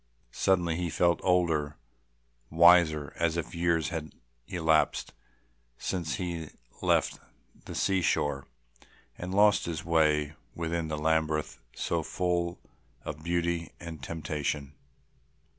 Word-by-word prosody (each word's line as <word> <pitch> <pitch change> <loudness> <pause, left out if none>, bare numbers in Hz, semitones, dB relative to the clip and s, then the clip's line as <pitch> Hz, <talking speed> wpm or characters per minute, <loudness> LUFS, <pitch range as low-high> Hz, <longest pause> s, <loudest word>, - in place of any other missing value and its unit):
Suddenly 85 -4 +1
he 90 -1 -1
felt 85 +2 +2
older, 80 -5 +1 0.7
wiser, 80 -3 +5
as 85 0 +1
if 85 - -4
years 85 -3 +1
had 80 -2 -5 0.3
elapsed 80 -3 +1 0.6
since 85 -6 -2
he 85 -4 -4 0.3
left - - +2 0.5
the - - -7
sea 95 -1 +2
shore 70 -4 0 0.7
and 90 +1 -6
lost 105 +1 +4
his 80 -1 -4
way 75 -3 +2 0.2
within 85 0 -2
this 75 -1 -3
labyrinth 80 -1 0 0.2
so - - -1
full 90 -1 -1 0.5
of 75 0 -5
beauty 85 -1 -1
and 85 -4 -8
temptation. 75 -1 -3
80 Hz, 110 wpm, -29 LUFS, 75-85 Hz, 0.7 s, wiser